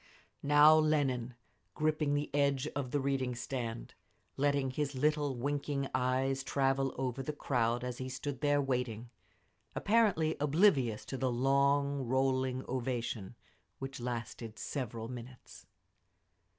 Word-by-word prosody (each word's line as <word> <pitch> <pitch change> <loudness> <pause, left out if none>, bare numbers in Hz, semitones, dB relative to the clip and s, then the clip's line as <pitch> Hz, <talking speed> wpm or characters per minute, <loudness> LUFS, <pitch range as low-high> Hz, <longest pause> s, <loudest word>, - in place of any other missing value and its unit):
Now 145 +2 +7
Lenin, 140 -6 +1 0.4
gripping 155 -1 +1
the 145 0 -2
edge 140 -1 +2
of 135 -3 -2
the 145 - 0
reading 135 -2 -1
stand, 120 -2 -5 0.4
letting 140 -1 +1
his 140 +1 -2
little 145 0 +1
winking 140 +1 -2
eyes 130 +1 +1
travel 135 0 0
over 130 0 -2
the 135 - -3
crowd 120 -4 0
as 125 -1 -4
he 130 0 -4
stood 130 0 -5
there 145 -1 +3
waiting, 125 -4 -2 0.6
apparently 200 -8 +2
oblivious 145 - +3
to 135 - -5
the 130 -1 0
long 140 +2 +2
rolling 130 0 +1
ovation, 120 -4 -3 0.4
which 135 0 -6
lasted 120 -2 -5
several 115 -5 -4
minutes. 125 0 -10
135 Hz, 125 wpm, -33 LUFS, 125-145 Hz, 0.6 s, Now